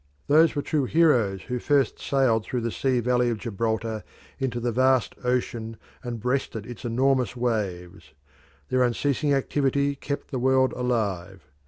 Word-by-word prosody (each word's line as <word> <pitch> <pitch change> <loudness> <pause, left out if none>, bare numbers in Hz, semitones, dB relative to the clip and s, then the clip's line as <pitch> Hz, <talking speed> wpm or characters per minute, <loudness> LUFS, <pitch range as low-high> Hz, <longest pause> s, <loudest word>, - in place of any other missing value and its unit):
Those 160 +2 +4
were 145 - -1
true 150 -4 0
heroes 125 - +2
who 125 0 -3
first 140 +1 +1
sailed 130 -5 +1
through 125 +2 -3
the 115 0 -2
sea 130 0 0
valley 125 0 +2
of 115 - -1
Gibraltar 110 0 -2 0.4
into 125 -3 -2
the 120 0 -1
vast 130 -3 +2
ocean 120 -3 -2 0.3
and 120 -2 -5
breasted 125 -2 -2
its 120 -1 -9
enormous 130 +2 +1
waves. 95 -8 -3 0.6
Their 130 - +2
unceasing 140 +4 +1
activity 140 0 +1
kept 140 +2 -5
the 130 - -2
world 130 +1 +3
alive. 100 - -2
125 Hz, 150 wpm, -25 LUFS, 110-135 Hz, 0.6 s, Those